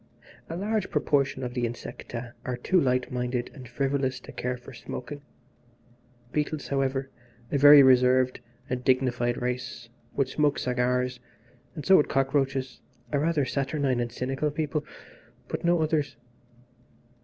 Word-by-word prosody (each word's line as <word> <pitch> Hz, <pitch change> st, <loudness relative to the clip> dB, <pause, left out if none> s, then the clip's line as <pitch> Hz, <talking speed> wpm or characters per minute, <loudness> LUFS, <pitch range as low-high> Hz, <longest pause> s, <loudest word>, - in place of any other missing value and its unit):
A 165 Hz, -, -4 dB
large 210 Hz, +3 st, -1 dB
proportion 140 Hz, -2 st, +1 dB
of 125 Hz, -1 st, -4 dB
the 125 Hz, -1 st, -2 dB
insecta 120 Hz, 0 st, -7 dB
are 125 Hz, -1 st, -3 dB
too 180 Hz, +8 st, +2 dB
light 125 Hz, -2 st, +1 dB
minded 125 Hz, 0 st, -2 dB
and 130 Hz, -4 st, -11 dB
frivolous 135 Hz, 0 st, -1 dB
to -, -, -11 dB
care 125 Hz, 0 st, -3 dB
for 125 Hz, +2 st, -13 dB
smoking. 130 Hz, +4 st, -7 dB, 1.1 s
Beetles, 150 Hz, 0 st, -2 dB
however, 135 Hz, 0 st, -1 dB, 0.4 s
a 140 Hz, -, +1 dB
very 145 Hz, 0 st, +10 dB
reserved 130 Hz, 0 st, +4 dB, 0.3 s
and 125 Hz, -2 st, -3 dB
dignified 125 Hz, -2 st, +1 dB
race, 125 Hz, -1 st, -4 dB, 0.3 s
would 135 Hz, -, +1 dB
smoke 145 Hz, +1 st, +1 dB
cigars, 125 Hz, 0 st, 0 dB, 0.6 s
and 150 Hz, -, -6 dB
so 190 Hz, 0 st, +7 dB
would 150 Hz, -, +2 dB
cockroaches, 135 Hz, -1 st, 0 dB, 0.3 s
a 145 Hz, -, +1 dB
rather 155 Hz, -2 st, +1 dB
saturnine 135 Hz, -1 st, 0 dB
and 120 Hz, -1 st, -2 dB
cynical 135 Hz, +5 st, -2 dB
people; 150 Hz, 0 st, -2 dB, 0.6 s
but -, -, -4 dB
no 170 Hz, -1 st, +3 dB
others. 150 Hz, -4 st, 0 dB
130 Hz, 140 wpm, -27 LUFS, 125-145 Hz, 1.1 s, very